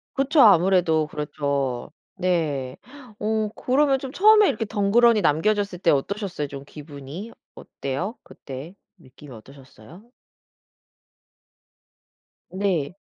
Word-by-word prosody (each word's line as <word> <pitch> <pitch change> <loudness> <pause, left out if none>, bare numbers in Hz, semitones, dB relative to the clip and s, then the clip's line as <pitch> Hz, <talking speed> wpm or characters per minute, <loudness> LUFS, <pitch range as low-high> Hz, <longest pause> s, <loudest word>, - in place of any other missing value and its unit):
그쵸. 280 +2 +2
아무래도 175 -5 +4
그렇죠. 140 -4 -3 0.3
네. 155 -8 -1 0.4
어 215 0 -1
그러면 270 +1 +2
좀 265 0 -8
처음에 425 +2 +5
이렇게 225 - -1
덩그러니 215 +2 +3
남겨졌을 195 +4 0
때 175 - +3
어떠셨어요 175 +1 -2
좀 140 -1 -9
기분이? 150 +8 -10 0.2
어때요 155 - -5
그때 140 +7 -10 0.2
느낌이 135 -2 -15
어떠셨어요? 135 - -15 2.5
네. 185 -6 -1
175 Hz, 245 characters per minute, -23 LUFS, 140-215 Hz, 2.5 s, 처음에